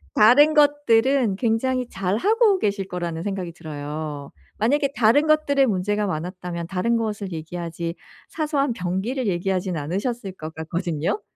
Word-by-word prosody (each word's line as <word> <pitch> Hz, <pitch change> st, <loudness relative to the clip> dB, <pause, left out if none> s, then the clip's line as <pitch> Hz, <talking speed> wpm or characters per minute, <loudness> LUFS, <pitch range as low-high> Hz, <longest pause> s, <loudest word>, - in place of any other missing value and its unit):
다른 270 Hz, +8 st, +6 dB
것들은 275 Hz, -6 st, +3 dB
굉장히 250 Hz, +3 st, 0 dB
잘하고 385 Hz, -, +2 dB
계실 200 Hz, -, -1 dB
거라는 170 Hz, -3 st, -4 dB
생각이 190 Hz, -3 st, -3 dB
들어요. 150 Hz, -2 st, -6 dB, 0.3 s
만약에 280 Hz, +6 st, +2 dB
다른 245 Hz, +7 st, +4 dB
것들에 285 Hz, -3 st, +3 dB
문제가 205 Hz, -1 st, 0 dB
많았다면 175 Hz, 0 st, -4 dB
다른 195 Hz, +6 st, 0 dB
것을 210 Hz, -4 st, -3 dB
얘기하지 165 Hz, +1 st, -5 dB, 0.3 s
사소한 295 Hz, -4 st, 0 dB
변기를 210 Hz, +6 st, -2 dB
얘기하지는 180 Hz, -2 st, -1 dB
않으셨을 195 Hz, -, -3 dB
것 160 Hz, -3 st, -8 dB
같거든요. 165 Hz, -, -2 dB
200 Hz, 345 characters per minute, -23 LUFS, 175-255 Hz, 0.3 s, 다른